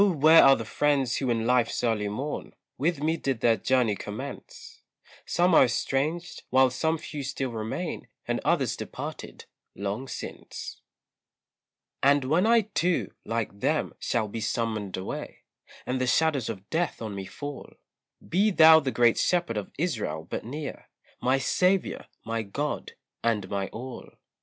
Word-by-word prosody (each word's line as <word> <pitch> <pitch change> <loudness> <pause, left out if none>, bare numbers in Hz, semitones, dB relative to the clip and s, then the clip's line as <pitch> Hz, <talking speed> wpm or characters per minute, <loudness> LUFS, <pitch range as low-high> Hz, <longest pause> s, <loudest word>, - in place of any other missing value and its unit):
where 165 -5 +7
are 135 0 +8
the 115 - -5
friends 140 0 +1
who 130 - -1
in 115 -1 0
life's 125 -1 +2
early 110 -3 +1
morn, 135 +9 -4 0.2
With 155 +1 -1
me 160 +1 +1
did 135 -7 -2
their 115 -1 +4
journey 125 -5 +2
commence; 455 - -8 0.5
Some 175 +1 +2
are 155 - +8
estranged, 145 +7 -1
while 130 0 +5
some 160 +5 0
few 150 -1 -6
still 135 -1 -3
remain, 115 +10 -4 0.2
And - - 0
others - - +1
departed - - -7 0.3
long 100 +6 -3
since. - - -7 1.2
And 140 0 +4
when 165 +10 +3
I 230 0 +6
too, 180 -4 -1
like 115 -3 -3
them, - - 0
shall 110 -2 0
be 110 +2 -5
summoned 110 -4 -2
away, 95 - -6 0.4
And 130 0 -1
the 130 - +1
shadows 145 -3 +2
of 100 -3 -6
death 170 +2 0
on 110 -3 -5
me 100 -1 -5
fall, 145 -2 -7 0.6
Be 200 +5 +3
thou 160 -4 +8
the 140 -4 -2
Great 120 -2 +3
Shepherd 175 -9 +1
of 105 -2 -4
Israel 105 - -2
but - - -4
near, 140 +5 -7 0.3
My 130 +2 +3
Saviour, 180 +8 +1 0.2
my 115 0 -1
God, 140 +9 -4 0.3
and 110 -4 +1
my 100 -1 -1
all. 125 +2 -8
130 Hz, 150 wpm, -27 LUFS, 115-160 Hz, 1.2 s, are